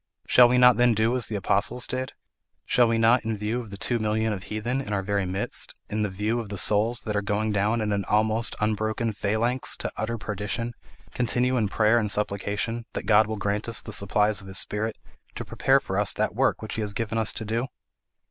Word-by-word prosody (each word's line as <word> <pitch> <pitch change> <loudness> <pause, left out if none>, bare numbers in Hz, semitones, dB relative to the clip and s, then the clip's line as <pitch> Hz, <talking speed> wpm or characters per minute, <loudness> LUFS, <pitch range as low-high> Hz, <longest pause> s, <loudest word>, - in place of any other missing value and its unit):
Shall 125 -1 +6
we 125 - +3
not 125 0 +6
then 120 -2 +4
do 110 +3 +2
as 125 - -1
the 110 - -4
apostles 100 +5 +1
did? 130 0 -4 0.5
Shall 120 -1 +4
we 115 0 +1
not, 115 +2 +4
in 110 0 -2
view 105 +4 -2
of 115 - -11
the 100 - -8
two 120 +4 -1
millions 110 0 0
of 95 -2 -6
heathen 120 +5 -2
in 105 -6 -5
our 100 -1 -1
very 100 -1 -1
midst, 95 +2 -4 0.2
in 105 0 0
view 105 +5 -2
of 110 -3 -6
the 100 - -5
souls 110 +5 +2
that 105 -2 -4
are 105 - +1
going 105 +1 -1
down 105 +3 +1
in 105 -1 -1
an 100 -1 0
almost 110 +2 +1
unbroken 110 +1 -1
phalanx 110 +5 -1
to - - -4
utter 115 +2 -2
perdition, 105 +3 -3 0.4
continue 125 +1 +1
in 110 -5 +1
prayer 110 +4 +3
and 105 -2 -1
supplication, 105 +3 -2
that - - -4
God 110 0 +5
will 110 0 -4
grant 105 +2 -2
us 115 - -2
the 110 - -7
supplies 105 +1 +2
of 95 - -13
his 95 - -1
Spirit 110 +1 -1 0.4
to - - -5
prepare - - +2
us - - -3
for - - 0
that - - 0
work - - +1
which - - -5
he 110 - -2
has 105 -1 -2
given 115 +1 -2
us 110 0 +2
to 110 - -5
do? 115 +4 -1
110 Hz, 225 wpm, -25 LUFS, 105-115 Hz, 0.5 s, Shall